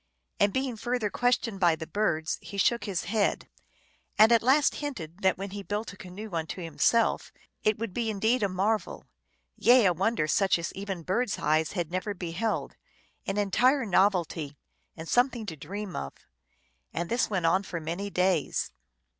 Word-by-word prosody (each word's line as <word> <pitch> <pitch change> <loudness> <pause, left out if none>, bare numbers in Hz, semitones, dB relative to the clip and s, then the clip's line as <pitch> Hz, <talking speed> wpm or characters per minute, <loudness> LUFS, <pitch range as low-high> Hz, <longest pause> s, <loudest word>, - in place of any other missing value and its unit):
And 205 0 +4
being 260 -2 -2
further 240 -2 -1
questioned 245 -4 0
by 175 -3 +4
the 160 0 -7
birds, 160 -4 -1
he 200 - -8
shook 235 +4 +2
his 195 -5 -2
head, 210 -1 0 0.7
and 220 +2 +7
at 230 - +6
last 275 +5 +4
hinted 185 - -6
that 190 -2 +2
when 195 +1 -5
he 200 0 -5
built 205 +2 -4
a - - -11
canoe 195 +3 -9
unto 160 +2 -3
himself 185 +7 +1 0.3
it 215 -1 +2
would 225 -4 -4
be 230 +1 -1
indeed 220 +4 +1
a 200 - +1
marvel; 195 +2 -1 0.5
yea, 245 0 +5
a 180 - +4
wonder 195 0 0
such 190 +3 +3
as 170 -1 -4
even 195 -3 -5
birds 200 +6 0
eyes 155 +1 +1
had 175 -5 -3
never 185 +3 -2
beheld, 180 +5 -3 0.5
an 195 - -1
entire 245 +7 +3
novelty, 175 -7 +1 0.4
and 160 0 -7
something 245 0 +2
to 170 -6 -5
dream 195 +5 -6
of. 70 - -5 0.8
And 170 +1 -3
this 235 +5 0
went 185 -5 -1
on 185 +4 +3
for 175 -3 -5
many 170 +6 -4
days. 180 -5 0
200 Hz, 170 wpm, -28 LUFS, 175-225 Hz, 0.8 s, and